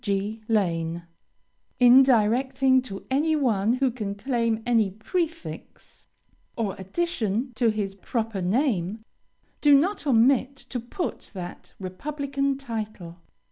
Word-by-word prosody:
G. 205 Hz, +2 st, -2 dB
Lane. 170 Hz, -6 st, 0 dB, 0.8 s
In 250 Hz, +1 st, +8 dB
directing 260 Hz, +2 st, +3 dB
to 195 Hz, -6 st, -8 dB
any 310 Hz, +4 st, +2 dB
one 225 Hz, -7 st, +2 dB
who 260 Hz, 0 st, +1 dB
can 210 Hz, -4 st, -4 dB
claim 230 Hz, 0 st, -1 dB
any 230 Hz, -4 st, +3 dB
prefix, 325 Hz, -, -5 dB, 0.5 s
or 215 Hz, -5 st, -1 dB
addition, 235 Hz, -, -2 dB
to 235 Hz, 0 st, +2 dB
his 210 Hz, -3 st, -2 dB
proper 220 Hz, +1 st, -3 dB
name 215 Hz, -, 0 dB, 0.6 s
do 290 Hz, -1 st, +7 dB
not 355 Hz, +2 st, 0 dB
omit 260 Hz, +2 st, +3 dB
to 265 Hz, -2 st, -6 dB
put 245 Hz, +10 st, -5 dB
that 180 Hz, -1 st, -8 dB
"republican 275 Hz, +7 st, -2 dB
title." 215 Hz, -9 st, -6 dB
230 Hz, 115 wpm, -25 LUFS, 200-270 Hz, 0.8 s, In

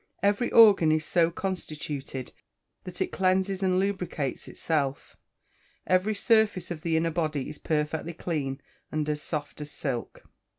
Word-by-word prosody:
Every 205 Hz, +4 st, +2 dB
organ 200 Hz, -8 st, +7 dB
is 155 Hz, 0 st, +1 dB
so 170 Hz, 0 st, +3 dB
constituted 150 Hz, -7 st, -5 dB, 0.5 s
that 180 Hz, -1 st, -7 dB
it -, -, 0 dB
cleanses 190 Hz, +1 st, +1 dB
and 185 Hz, -1 st, +2 dB
lubricates 185 Hz, -8 st, -2 dB
itself. 140 Hz, -4 st, -2 dB, 0.7 s
Every 185 Hz, +4 st, +2 dB
surface 210 Hz, -5 st, +2 dB
of 160 Hz, -3 st, -5 dB
the 165 Hz, -1 st, +1 dB
inner 165 Hz, +1 st, +1 dB
body 155 Hz, -4 st, -1 dB
is 150 Hz, -, -8 dB
perfectly 155 Hz, +2 st, -1 dB
clean, 145 Hz, -5 st, -3 dB, 0.3 s
and 155 Hz, -1 st, -1 dB
as 150 Hz, -1 st, -1 dB
soft 150 Hz, -1 st, -5 dB
as 150 Hz, -, -6 dB
silk. 135 Hz, -5 st, -4 dB
165 Hz, 140 wpm, -27 LUFS, 150-185 Hz, 0.7 s, organ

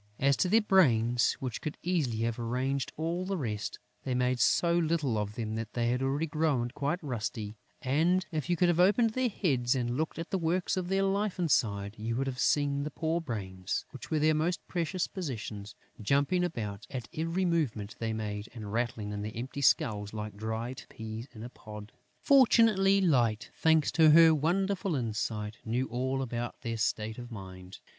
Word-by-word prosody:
As 140 Hz, +1 st, +3 dB
to 180 Hz, -, +1 dB
their 225 Hz, +4 st, +5 dB
brains, 125 Hz, -, +3 dB
which 125 Hz, -3 st, -5 dB
could 155 Hz, -, -4 dB
easily 150 Hz, -11 st, 0 dB
have 115 Hz, 0 st, -1 dB
arranged 130 Hz, +3 st, -1 dB
all 165 Hz, +3 st, -1 dB
the 190 Hz, +1 st, -2 dB
rest, 105 Hz, -8 st, -3 dB, 0.2 s
they 130 Hz, -, -2 dB
made 125 Hz, 0 st, +1 dB
so 170 Hz, +6 st, +3 dB
little 160 Hz, -7 st, +1 dB
of 105 Hz, 0 st, -2 dB
them 110 Hz, -2 st, -3 dB
that 110 Hz, -1 st, -5 dB
they 120 Hz, -1 st, 0 dB
had 125 Hz, +1 st, 0 dB
already 140 Hz, +4 st, 0 dB
grown 145 Hz, -6 st, 0 dB
quite 145 Hz, +7 st, -1 dB
rusty; 110 Hz, -5 st, -4 dB, 0.3 s
and, 170 Hz, +8 st, +2 dB
if 155 Hz, +1 st, -3 dB
you 175 Hz, -, +3 dB
could 175 Hz, +1 st, +3 dB
have 175 Hz, -1 st, +2 dB
opened 210 Hz, +5 st, +4 dB
their 255 Hz, +2 st, 0 dB
heads 135 Hz, -, +1 dB
and 120 Hz, -1 st, -1 dB
looked 155 Hz, +2 st, -2 dB
at 165 Hz, 0 st, -6 dB
the 190 Hz, -, 0 dB
works 175 Hz, +3 st, 0 dB
of 185 Hz, -2 st, -2 dB
their 195 Hz, +1 st, +1 dB
life 200 Hz, 0 st, 0 dB
inside, 105 Hz, -, +1 dB
you 115 Hz, +2 st, -2 dB
would 135 Hz, +3 st, 0 dB
have 130 Hz, -2 st, -4 dB
seen 140 Hz, -1 st, +2 dB
the 150 Hz, -, -3 dB
poor 160 Hz, +3 st, -1 dB
brains, 95 Hz, -, -4 dB
which 135 Hz, -, -10 dB
were 155 Hz, -, +1 dB
their 155 Hz, +1 st, +3 dB
most 160 Hz, +3 st, -1 dB
precious 175 Hz, +1 st, -1 dB
possession, 115 Hz, -, -5 dB, 0.3 s
jumping 140 Hz, -, +2 dB
about 105 Hz, -, -4 dB
at 130 Hz, -4 st, -5 dB
every 165 Hz, +4 st, -1 dB
movement 135 Hz, -, -1 dB
they 115 Hz, -1 st, -1 dB
made 105 Hz, -1 st, -4 dB
and 105 Hz, -3 st, -7 dB
rattling 115 Hz, -3 st, -2 dB
in 105 Hz, 0 st, -4 dB
their 105 Hz, +1 st, -4 dB
empty 130 Hz, +4 st, -5 dB
skulls 105 Hz, -6 st, +2 dB
like 105 Hz, -1 st, -5 dB
dry 110 Hz, +3 st, -3 dB, 0.2 s
peas 110 Hz, +2 st, -7 dB
in 110 Hz, -, -8 dB
a 120 Hz, -, -6 dB
pod. 105 Hz, -3 st, -10 dB, 0.3 s
Fortunately, 225 Hz, -8 st, +5 dB
Light, 120 Hz, -, +2 dB
thanks 160 Hz, -2 st, +3 dB
to 160 Hz, 0 st, +5 dB
her 165 Hz, +1 st, +8 dB
wonderful 185 Hz, +4 st, 0 dB
insight, 110 Hz, -3 st, -3 dB
knew 120 Hz, +3 st, -1 dB
all 130 Hz, +2 st, -1 dB
about 120 Hz, -1 st, -4 dB
their 115 Hz, -2 st, -3 dB
state 110 Hz, +1 st, -1 dB
of 120 Hz, 0 st, -8 dB
mind. 95 Hz, -3 st, -9 dB
130 Hz, 190 wpm, -30 LUFS, 110-165 Hz, 0.3 s, her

